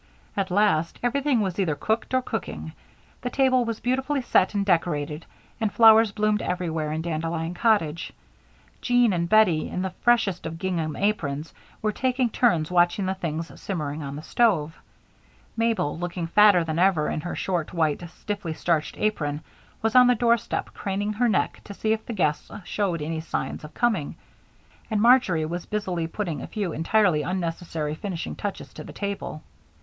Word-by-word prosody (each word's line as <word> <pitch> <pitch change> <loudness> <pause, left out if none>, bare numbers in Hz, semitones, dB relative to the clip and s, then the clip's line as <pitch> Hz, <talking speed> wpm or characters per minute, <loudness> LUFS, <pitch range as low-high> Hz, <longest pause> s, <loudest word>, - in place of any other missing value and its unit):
At 195 -1 -1
last, 180 -4 +2
everything 265 0 +1
was 190 -2 -2
either 165 -6 +1
cooked 220 - -1
or 255 - +2
cooking. - - -5 0.5
The 250 - -2
table 255 -1 +3
was 230 -1 -3
beautifully 265 +2 -1
set 200 -3 +2
and 200 -1 +1
decorated 160 -4 0 0.3
and 220 -3 0
flowers 225 -1 +7
bloomed 210 0 +1
everywhere 165 -4 -2
in 160 +1 -2
Dandelion 165 0 -2
Cottage. 180 -6 +1 0.7
Jean 245 -3 +3
and 170 -1 -1
Bettie, 195 -7 +4
in 185 - -3
the 190 -1 -3
freshest 225 -8 +2
of 165 0 -6
gingham 165 -4 -2
aprons, 165 -8 -1 0.3
were 215 - +2
taking 255 +1 0
turns 175 -11 +2
watching 175 +2 +3
the 190 - 0
things 165 -3 -5
simmering 155 -5 -3
on 140 -1 -5
the 150 - -7
stove. 170 -11 +1 0.8
Mabel, 225 -9 0
looking 175 -1 -3
fatter 200 +1 +5
than 160 0 -2
ever 180 -5 +3
in 155 - -2
her 175 - -5
short, 175 -5 -2
white, 160 -3 0
stiffly 195 -1 -5
starched 160 -2 -1
apron, 150 -9 -1 0.4
was 225 +2 0
on 250 0 +8
the 250 - +4
doorstep 235 0 0
craning 205 +2 -2
her 240 +3 +2
neck 205 - 0
to 200 - -9
see 220 +2 +1
if 220 - -3
the 235 - -4
guests 155 -7 0 0.2
showed 180 -7 -1
any 160 +1 -3
signs 160 - -4
of 150 0 -11
coming, 215 -12 0 0.7
and 215 -2 0
Marjory 215 -9 +4
was 175 +2 -5
busily 185 -6 -2
putting 165 -6 -4
a - - -6
few 200 -7 -3
entirely 170 0 +2
unnecessary 165 -3 -3
finishing 175 +1 -5
touches 205 -1 -5
to - - -8
the - - -10
table. 200 -6 -5
185 Hz, 170 wpm, -25 LUFS, 160-220 Hz, 0.8 s, on